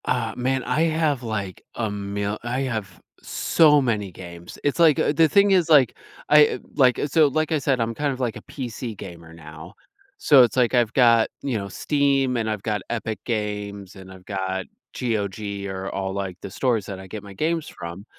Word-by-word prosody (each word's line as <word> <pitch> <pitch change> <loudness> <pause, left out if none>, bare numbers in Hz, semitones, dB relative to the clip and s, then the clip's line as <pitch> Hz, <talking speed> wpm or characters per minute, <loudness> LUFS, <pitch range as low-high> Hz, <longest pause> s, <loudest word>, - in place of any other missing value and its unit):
Uh, 115 -3 -1
man, 130 +1 -1
I 155 - 0
have, 155 -4 +1
like, 100 -5 -4
a 110 -2 -2
mil 100 +1 -3
I 125 +2 -2
have 110 -7 -4 0.2
so 150 -3 +3
many 105 -6 -1
games. 85 -1 -11
It's, 145 +3 0
like, 160 -4 +6
a - - +2
the 160 +1 +4
thing 200 +5 +4
is, 180 -4 +3
like, 140 -6 +5 0.3
I, 150 0 +5 0.2
like, 130 -4 +4
so, 155 +1 +4
like, 155 +3 -1
I 155 - +2
said, 135 -2 0
I'm 115 0 -1
kind 145 +4 -1
of, 130 - -6
like, 120 -3 -1
a - - -8
PC 120 -3 -6
gamer 85 -4 -10
now, 80 +1 -11 0.4
so 145 - +6
it's, 120 - 0
like, 125 -1 +3
I've 120 -3 +2
got, 115 -3 +5
you 130 -5 -1
know, 100 -1 -5
Steam, 140 +2 +1
and 110 -1 -1
I've 105 -2 -3
got 105 -3 -1
Epic 110 -2 -3
Games, 105 -3 -4
and 95 -1 -12
I've 95 -1 -14
got 95 -2 -3 0.3
GOG 100 -3 -3
or 95 0 -5
all, 95 -1 -3
like, 95 -2 -4
the - - -7
stores 115 -4 0
that 95 -2 -6
I 95 - -10
get 105 +2 -8
my 100 -1 -11
games 160 - -1
from 85 +4 -8
115 Hz, 200 wpm, -23 LUFS, 100-135 Hz, 0.4 s, like